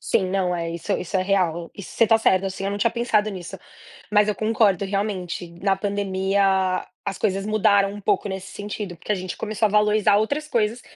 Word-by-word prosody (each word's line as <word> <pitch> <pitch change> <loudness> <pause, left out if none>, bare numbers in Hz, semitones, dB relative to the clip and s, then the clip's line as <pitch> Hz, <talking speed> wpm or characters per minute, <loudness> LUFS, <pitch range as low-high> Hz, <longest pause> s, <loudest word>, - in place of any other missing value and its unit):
Sim, 185 -1 0
não 185 -2 0
é, 170 -1 -3
isso 170 +4 -4
isso 190 +1 -2
é 185 - +1
real, 175 -4 0
e 200 - -9
você 230 +4 +1
tá 225 - +5
certo, 190 -3 +2
assim, 190 0 -5
eu 195 - -1
não 205 - -3
tinha 230 +3 +2
pensado 225 -3 +1
nisso. 185 -3 -8 0.5
Mas 210 0 +4
eu 210 - +1
concordo 215 -3 +2
realmente, 195 -3 -3
na 195 0 +2
pandemia 195 -1 0 0.2
as 195 - -3
coisas 195 -1 -1
mudaram 200 -2 +3
um 205 - -8
pouco 205 0 +1
nesse 190 0 -6
sentido, 205 -2 -5
porque 170 - -10
a - - +4
gente 185 -2 -5
começou 215 0 -2
a - - -2
valorizar 210 0 +3
outras 285 +9 0
coisas 230 -4 0
200 Hz, 210 wpm, -23 LUFS, 190-210 Hz, 0.5 s, tá